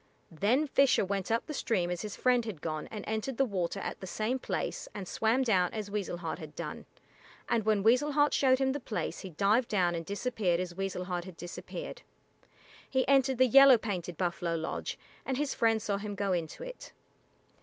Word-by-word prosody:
Then 220 Hz, -, +2 dB
Fisher 275 Hz, -6 st, +3 dB
went 195 Hz, -1 st, -2 dB
up 230 Hz, +1 st, +1 dB
the 305 Hz, -, -5 dB
stream 185 Hz, -10 st, 0 dB
as 175 Hz, -, -3 dB
his 210 Hz, -2 st, -5 dB
friend 250 Hz, -1 st, +3 dB
had 215 Hz, -8 st, -6 dB
gone 155 Hz, 0 st, -4 dB
and 210 Hz, -2 st, -6 dB
entered 220 Hz, +3 st, -2 dB
the 270 Hz, -, +4 dB
water 195 Hz, -4 st, -2 dB
at -, -, -4 dB
the 190 Hz, -, -7 dB
same 220 Hz, +7 st, -1 dB
place -, -, -3 dB
and 195 Hz, -3 st, -5 dB
swam 225 Hz, +7 st, +1 dB
down 185 Hz, -7 st, +2 dB
as 210 Hz, -2 st, -4 dB
Weasel 200 Hz, -4 st, -2 dB
Heart 165 Hz, -1 st, -4 dB
had 155 Hz, -2 st, -9 dB
done, -, -, -6 dB, 0.6 s
and 225 Hz, -3 st, +1 dB
when 215 Hz, -2 st, +2 dB
Weasel 255 Hz, +7 st, +4 dB
Heart 290 Hz, 0 st, +3 dB
showed 260 Hz, -1 st, +4 dB
him 265 Hz, 0 st, +1 dB
the 285 Hz, -, -2 dB
place 225 Hz, -4 st, -4 dB
he 190 Hz, -, -7 dB
dived 205 Hz, +8 st, +2 dB
down 180 Hz, -4 st, +2 dB
and 165 Hz, -1 st, -3 dB
disappeared 200 Hz, -2 st, -1 dB
as 180 Hz, -1 st, -3 dB
Weasel 190 Hz, -1 st, -3 dB
Heart 180 Hz, -1 st, -3 dB
had 185 Hz, -3 st, -10 dB
disappeared. -, -, -7 dB, 0.9 s
He 260 Hz, -1 st, +1 dB
entered 270 Hz, -2 st, +4 dB
the 260 Hz, -, +6 dB
yellow 270 Hz, +1 st, +8 dB
painted 180 Hz, -6 st, -4 dB
buffalo 175 Hz, -2 st, -1 dB
lodge, 160 Hz, 0 st, -3 dB, 0.3 s
and 265 Hz, -1 st, -2 dB
his 290 Hz, 0 st, -1 dB
friend 225 Hz, -1 st, +2 dB
saw 205 Hz, -2 st, -1 dB
him 205 Hz, 0 st, -5 dB
go 200 Hz, -1 st, 0 dB
into 170 Hz, -, -3 dB
it. -, -, -9 dB
210 Hz, 205 wpm, -31 LUFS, 180-255 Hz, 0.9 s, yellow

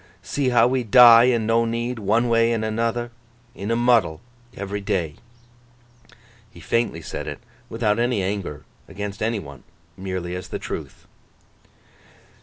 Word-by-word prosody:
See 140 Hz, -3 st, -1 dB
how 120 Hz, -2 st, +4 dB
we 125 Hz, 0 st, +1 dB
die 120 Hz, +1 st, +8 dB
an' 120 Hz, -3 st, +1 dB
no 115 Hz, +1 st, +2 dB
need, 115 Hz, +1 st, -3 dB
one 110 Hz, +4 st, +1 dB
way 115 Hz, 0 st, +3 dB
an' 115 Hz, -2 st, -1 dB
another—in 115 Hz, 0 st, -5 dB
a 115 Hz, -, +1 dB
muddle—every 120 Hz, -1 st, -1 dB
day!' 85 Hz, -6 st, -2 dB, 1.3 s
He 110 Hz, -, -16 dB
faintly 115 Hz, -9 st, -1 dB
said -, -, -6 dB
it, -, -, -5 dB, 0.3 s
without 115 Hz, -2 st, 0 dB
any 120 Hz, -4 st, 0 dB
anger 95 Hz, -7 st, -4 dB, 0.2 s
against 100 Hz, +2 st, -7 dB
any 115 Hz, +1 st, 0 dB
one. 70 Hz, -8 st, -10 dB, 0.3 s
Merely 95 Hz, -2 st, -5 dB
as 90 Hz, -, -6 dB
the -, -, -5 dB
truth. -, -, -7 dB
115 Hz, 135 wpm, -22 LUFS, 100-120 Hz, 1.3 s, die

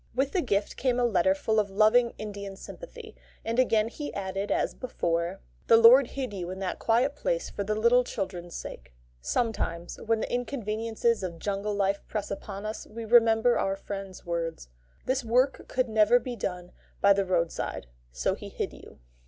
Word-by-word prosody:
With 270 Hz, +2 st, +1 dB
the 370 Hz, -, +1 dB
gift 205 Hz, -7 st, -1 dB
came 250 Hz, -2 st, +1 dB
a 245 Hz, -, +3 dB
letter 190 Hz, -4 st, +3 dB
full 220 Hz, +3 st, +1 dB
of 205 Hz, -1 st, 0 dB
loving, 220 Hz, +4 st, +4 dB
Indian 200 Hz, -2 st, -6 dB
sympathy; 475 Hz, -, -10 dB, 0.3 s
and 230 Hz, +2 st, 0 dB
again 225 Hz, -4 st, +3 dB
he 290 Hz, +5 st, -6 dB
added 195 Hz, +1 st, -3 dB
as -, -, 0 dB
before: 170 Hz, -, -2 dB, 0.3 s
"The 225 Hz, -, +7 dB
Lord 235 Hz, +3 st, +8 dB
hid 260 Hz, -5 st, -5 dB
you 180 Hz, -3 st, -5 dB
in 185 Hz, -, -5 dB
that 190 Hz, -1 st, -3 dB
quiet 245 Hz, +5 st, +2 dB
place -, -, -2 dB
for 200 Hz, -, -3 dB
the 215 Hz, +2 st, -1 dB
little 235 Hz, +3 st, +4 dB
children's 180 Hz, -7 st, -5 dB
sake." -, -, -8 dB, 0.3 s
Sometimes 175 Hz, -, -2 dB
when 225 Hz, 0 st, +1 dB
the -, -, -3 dB
inconveniences 230 Hz, -2 st, -1 dB
of 175 Hz, -3 st, -4 dB
jungle 200 Hz, +3 st, -2 dB
life 200 Hz, 0 st, +1 dB
press 210 Hz, -2 st, -4 dB
upon 200 Hz, +1 st, -6 dB
us, 215 Hz, +1 st, -5 dB
we 230 Hz, +1 st, -7 dB
remember 230 Hz, +1 st, +5 dB
our 195 Hz, 0 st, 0 dB
friend's 195 Hz, -1 st, -7 dB
words: 165 Hz, -, -3 dB, 0.4 s
"This 260 Hz, +1 st, 0 dB
work 250 Hz, +4 st, +1 dB
could 255 Hz, 0 st, 0 dB
never 220 Hz, +1 st, +4 dB
have 245 Hz, -, +4 dB
been 245 Hz, -3 st, -5 dB
done 180 Hz, -2 st, -4 dB, 0.3 s
by 200 Hz, 0 st, +6 dB
the 195 Hz, 0 st, +1 dB
road 175 Hz, -3 st, +1 dB
side, -, -, -4 dB, 0.3 s
so 60 Hz, -1 st, 0 dB
He -, -, -8 dB
hid -, -, -4 dB
you." -, -, -14 dB
215 Hz, 185 wpm, -28 LUFS, 195-240 Hz, 0.4 s, Lord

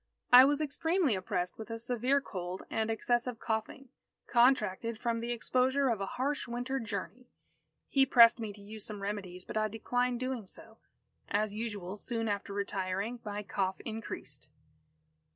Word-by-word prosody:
I 250 Hz, +1 st, +12 dB
was 290 Hz, +2 st, +2 dB
extremely 320 Hz, -, +1 dB
oppressed 185 Hz, -1 st, -2 dB
with 220 Hz, 0 st, -7 dB
a 230 Hz, -, -3 dB
severe 245 Hz, +4 st, +1 dB
cold 180 Hz, -6 st, -5 dB
and 220 Hz, 0 st, 0 dB
excessive 240 Hz, +2 st, 0 dB
coughing, 220 Hz, +4 st, -3 dB, 0.4 s
contracted 235 Hz, -3 st, +3 dB
from 235 Hz, -1 st, 0 dB
the 235 Hz, +1 st, -4 dB
exposure 260 Hz, +3 st, +2 dB
of 220 Hz, -4 st, 0 dB
a 195 Hz, -, -2 dB
harsh 280 Hz, +2 st, -1 dB
winter 245 Hz, +3 st, -2 dB
journey. 225 Hz, +3 st, -5 dB, 0.6 s
He 270 Hz, -1 st, +4 dB
pressed 235 Hz, -2 st, +7 dB
me 220 Hz, -2 st, -4 dB
to 205 Hz, -, -14 dB
use 210 Hz, +1 st, -9 dB
some 205 Hz, -2 st, -7 dB
remedies, 190 Hz, -3 st, -5 dB
but -, -, -4 dB
I 215 Hz, 0 st, +2 dB
declined 245 Hz, +3 st, -1 dB
doing 255 Hz, -5 st, -3 dB
so. 220 Hz, +4 st, -13 dB, 0.5 s
As 210 Hz, 0 st, 0 dB
usual, 205 Hz, -4 st, -4 dB
soon 225 Hz, +1 st, -3 dB
after 200 Hz, -1 st, -2 dB
retiring, 200 Hz, +3 st, -2 dB
my 210 Hz, 0 st, -4 dB
cough 190 Hz, -1 st, -1 dB
increased. 225 Hz, 0 st, -6 dB
225 Hz, 155 wpm, -32 LUFS, 205-250 Hz, 0.6 s, I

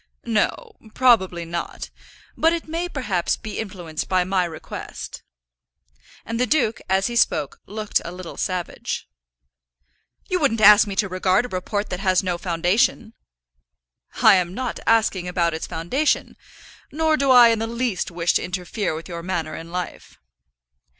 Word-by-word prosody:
"No; 240 Hz, -, -1 dB, 0.2 s
probably 190 Hz, -9 st, +3 dB
not. 170 Hz, +1 st, -5 dB, 0.4 s
But 325 Hz, +1 st, +3 dB
it 335 Hz, -1 st, -4 dB
may 335 Hz, +3 st, -3 dB
perhaps 205 Hz, -, -1 dB
be 215 Hz, -2 st, -6 dB
influenced 180 Hz, -7 st, -5 dB
by 185 Hz, -1 st, +3 dB
my 185 Hz, 0 st, +1 dB
request." 160 Hz, -2 st, -8 dB, 1.0 s
And 230 Hz, +1 st, -3 dB
the 250 Hz, -, +2 dB
duke, 230 Hz, -5 st, +1 dB
as 190 Hz, +1 st, +2 dB
he 240 Hz, -, -2 dB
spoke, 150 Hz, -10 st, +1 dB
looked 215 Hz, 0 st, -1 dB
a 170 Hz, -, -6 dB
little 180 Hz, -1 st, -8 dB
savage. 180 Hz, -3 st, -3 dB, 1.2 s
"You 365 Hz, -, 0 dB
wouldn't 270 Hz, -8 st, +1 dB
ask 210 Hz, 0 st, +8 dB
me 200 Hz, -, -4 dB
to 200 Hz, +1 st, +1 dB
regard 185 Hz, +4 st, +1 dB
a -, -, -7 dB
report 205 Hz, +2 st, -3 dB
that 180 Hz, -, -3 dB
has 185 Hz, -1 st, +2 dB
no 180 Hz, -2 st, -2 dB
foundation." 190 Hz, +7 st, +1 dB, 1.1 s
"I -, -, +8 dB
am 180 Hz, 0 st, -2 dB
not 255 Hz, -2 st, -3 dB
asking 215 Hz, -5 st, +2 dB
about 170 Hz, -2 st, 0 dB
its 160 Hz, -, -4 dB
foundation. 260 Hz, -, -1 dB, 0.6 s
Nor 315 Hz, +1 st, +2 dB
do 275 Hz, -2 st, 0 dB
I 245 Hz, -2 st, +8 dB
in 225 Hz, -1 st, +1 dB
the 225 Hz, -, -2 dB
least 235 Hz, -4 st, -2 dB
wish 170 Hz, -1 st, 0 dB
to -, -, +1 dB
interfere 180 Hz, 0 st, -3 dB
with 160 Hz, -, -7 dB
your 170 Hz, -1 st, -6 dB
manner 170 Hz, -3 st, -3 dB
in 165 Hz, +1 st, -9 dB
life." 180 Hz, -1 st, -6 dB
195 Hz, 155 wpm, -22 LUFS, 175-235 Hz, 1.2 s, ask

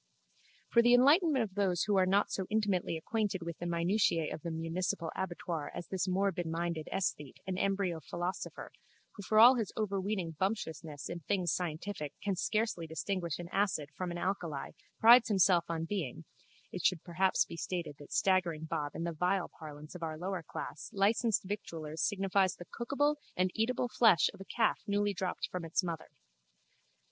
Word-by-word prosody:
For 235 Hz, -, +6 dB
the 240 Hz, +1 st, +6 dB
enlightenment 285 Hz, +1 st, +5 dB
of 200 Hz, -4 st, -6 dB
those 190 Hz, -3 st, +1 dB
who 205 Hz, +1 st, +1 dB
are 185 Hz, -1 st, +4 dB
not 200 Hz, +2 st, +2 dB
so 190 Hz, -2 st, -2 dB
intimately 205 Hz, -6 st, 0 dB
acquainted 200 Hz, +1 st, -2 dB
with 170 Hz, -1 st, -6 dB
the 175 Hz, -, -3 dB
minutiae 170 Hz, -1 st, +1 dB
of -, -, -7 dB
the 170 Hz, -, -4 dB
municipal 165 Hz, +1 st, -2 dB
abattoir 175 Hz, -4 st, -3 dB
as 175 Hz, -, -6 dB
this 190 Hz, 0 st, -1 dB
morbidminded 170 Hz, -4 st, -1 dB
esthete 150 Hz, -7 st, -2 dB
and 185 Hz, 0 st, -3 dB
embryo 195 Hz, -4 st, 0 dB
philosopher 175 Hz, +4 st, -5 dB, 0.4 s
who 205 Hz, -, -10 dB
for 215 Hz, +2 st, 0 dB
all 245 Hz, +4 st, +9 dB
his 225 Hz, -5 st, -2 dB
overweening 195 Hz, -4 st, -1 dB
bumptiousness 160 Hz, -7 st, -3 dB
in 170 Hz, -, -5 dB
things 180 Hz, 0 st, 0 dB
scientific 165 Hz, -2 st, -3 dB
can 200 Hz, -1 st, -1 dB
scarcely 210 Hz, -3 st, -1 dB
distinguish 170 Hz, 0 st, -2 dB
an 175 Hz, -, -7 dB
acid 185 Hz, -7 st, 0 dB
from 185 Hz, -1 st, -3 dB
an 175 Hz, -, -4 dB
alkali 175 Hz, -6 st, -3 dB, 0.3 s
prides 235 Hz, +2 st, +8 dB
himself 180 Hz, -4 st, +4 dB
on 165 Hz, -1 st, -2 dB
being, 165 Hz, -5 st, -4 dB, 0.5 s
it 180 Hz, -, -5 dB
should 180 Hz, -4 st, +2 dB
perhaps 185 Hz, +2 st, +2 dB
be -, -, -8 dB
stated 165 Hz, -3 st, -4 dB
that 145 Hz, -, -12 dB
staggering 180 Hz, -5 st, +2 dB
bob 155 Hz, -2 st, -3 dB
in -, -, -3 dB
the 170 Hz, 0 st, -2 dB
vile 180 Hz, +3 st, 0 dB
parlance 150 Hz, -1 st, -9 dB
of 180 Hz, -, -9 dB
our 160 Hz, -1 st, -3 dB
lowerclass 180 Hz, -1 st, -5 dB
licensed 215 Hz, +2 st, +2 dB
victuallers 165 Hz, -6 st, -5 dB
signifies 195 Hz, -2 st, +2 dB
the 175 Hz, -, -10 dB
cookable 290 Hz, +8 st, 0 dB, 0.2 s
and 185 Hz, 0 st, +2 dB
eatable 245 Hz, +2 st, 0 dB
flesh 220 Hz, -7 st, +4 dB
of -, -, -13 dB
a -, -, -8 dB
calf 225 Hz, +1 st, +1 dB
newly 205 Hz, 0 st, +1 dB
dropped 185 Hz, -1 st, -3 dB
from 180 Hz, -2 st, -4 dB
its 165 Hz, +3 st, 0 dB
mother. 170 Hz, -3 st, -4 dB
185 Hz, 170 wpm, -32 LUFS, 165-205 Hz, 0.5 s, all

